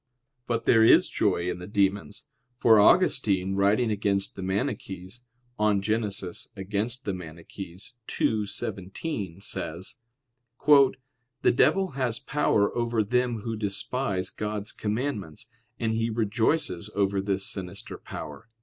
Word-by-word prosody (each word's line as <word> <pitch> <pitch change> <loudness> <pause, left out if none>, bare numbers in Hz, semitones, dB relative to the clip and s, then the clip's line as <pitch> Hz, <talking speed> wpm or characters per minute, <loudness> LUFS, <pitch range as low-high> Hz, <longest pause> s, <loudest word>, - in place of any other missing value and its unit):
But 115 -1 -1
there 115 -2 +6
is 110 - +7
joy 85 - 0
in 90 - -2
the 90 - -8
demons: 100 -5 0 0.3
for 110 -3 +6
Augustine 100 - +4
writing 105 +4 +2
against 100 -1 0
the 95 - -7
Maniches 95 0 -3 0.4
(De 105 -1 +3
Gen. 110 +3 0
Contra 100 +3 -4
Manich. 90 +3 -9 0.3
ii, 110 -2 +2
17) 95 - -4
says: 85 -2 -3 0.7
"The 130 -3 +3
devil 190 +9 +3
has 125 -4 -1
power 105 -8 +1
over 115 -2 +1
them 125 +1 0
who 115 +1 -3
despise 100 -1 -1
God's 105 -1 -3
commandments, 105 - -3 0.3
and 115 -1 0
he 115 +1 0
rejoices 110 - 0
over 100 -1 +1
this 95 0 -1
sinister 95 0 -5
power." 110 +1 -8
105 Hz, 120 wpm, -27 LUFS, 95-120 Hz, 0.7 s, is